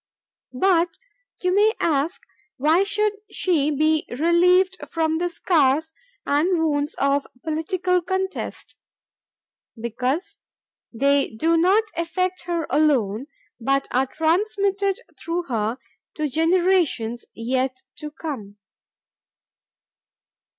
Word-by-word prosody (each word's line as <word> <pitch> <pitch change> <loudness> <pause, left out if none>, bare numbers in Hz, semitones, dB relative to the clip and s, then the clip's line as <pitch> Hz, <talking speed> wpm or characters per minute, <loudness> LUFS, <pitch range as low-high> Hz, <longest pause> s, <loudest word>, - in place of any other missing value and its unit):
"But... 350 -3 +2 0.5
you 365 0 +2
may 420 +3 +4
ask 315 +2 0 0.3
why 310 +7 +3
should 415 +1 +1 0.2
she 310 -6 +1
be 310 +1 +1
relieved 355 +7 +3
from 320 -1 0
the 350 0 0
scars 320 -2 +1 0.3
and 330 +6 +2
wounds 295 -2 0
of 280 0 +1 0.2
political 360 +3 0
contest? 380 +2 -4 1.0
Because 250 - -2 0.5
they 280 +4 +2
do 320 +9 +1
not 375 +6 +4
affect 365 +2 -2
her 340 -2 -1
alone 260 -6 +2 0.3
but 275 +3 0
are 260 +2 +2
transmitted 395 +5 0 0.2
through 340 +1 -2
her 230 -4 -2 0.4
to 305 -1 -1
generations 325 -6 +1
yet 255 +2 -2
to 300 - -6
come 260 -10 -7
320 Hz, 100 wpm, -23 LUFS, 275-360 Hz, 1.0 s, may